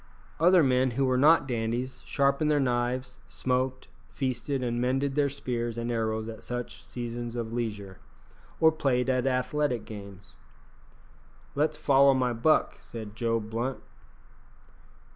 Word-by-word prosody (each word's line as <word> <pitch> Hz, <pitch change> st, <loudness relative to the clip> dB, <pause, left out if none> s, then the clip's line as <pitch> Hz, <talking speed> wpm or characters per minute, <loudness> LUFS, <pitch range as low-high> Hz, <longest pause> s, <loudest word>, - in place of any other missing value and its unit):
Other 175 Hz, +1 st, +6 dB
men 130 Hz, -1 st, +3 dB
who 135 Hz, -, +3 dB
were 130 Hz, -1 st, +2 dB
not 145 Hz, +2 st, +5 dB
dandies 120 Hz, +1 st, -2 dB
sharpened 140 Hz, +2 st, +2 dB
their 150 Hz, -1 st, +3 dB
knives, 125 Hz, 0 st, -1 dB
smoked, 130 Hz, 0 st, -2 dB, 0.2 s
feasted, 130 Hz, 0 st, -2 dB
and 120 Hz, -1 st, -1 dB
mended 135 Hz, +2 st, 0 dB
their 145 Hz, 0 st, +2 dB
spears 120 Hz, -4 st, -3 dB
and 120 Hz, +1 st, -2 dB
arrows 110 Hz, -1 st, -1 dB
at 115 Hz, -1 st, -8 dB
such 120 Hz, 0 st, -5 dB
seasons 120 Hz, -1 st, -5 dB
of 115 Hz, -1 st, -4 dB
leisure, 105 Hz, -6 st, -4 dB, 0.6 s
or 160 Hz, -1 st, +6 dB
played 130 Hz, -5 st, +1 dB
at 130 Hz, 0 st, +1 dB
athletic 130 Hz, -2 st, 0 dB
games. 100 Hz, -2 st, -11 dB, 1.2 s
"Let's 150 Hz, +1 st, 0 dB
follow 140 Hz, -2 st, +5 dB
my 125 Hz, -2 st, +1 dB
buck," 120 Hz, +7 st, +2 dB
said 110 Hz, -3 st, -9 dB
Joe 115 Hz, 0 st, 0 dB
Blunt. 115 Hz, +4 st, -3 dB
125 Hz, 135 wpm, -28 LUFS, 115-135 Hz, 1.2 s, Other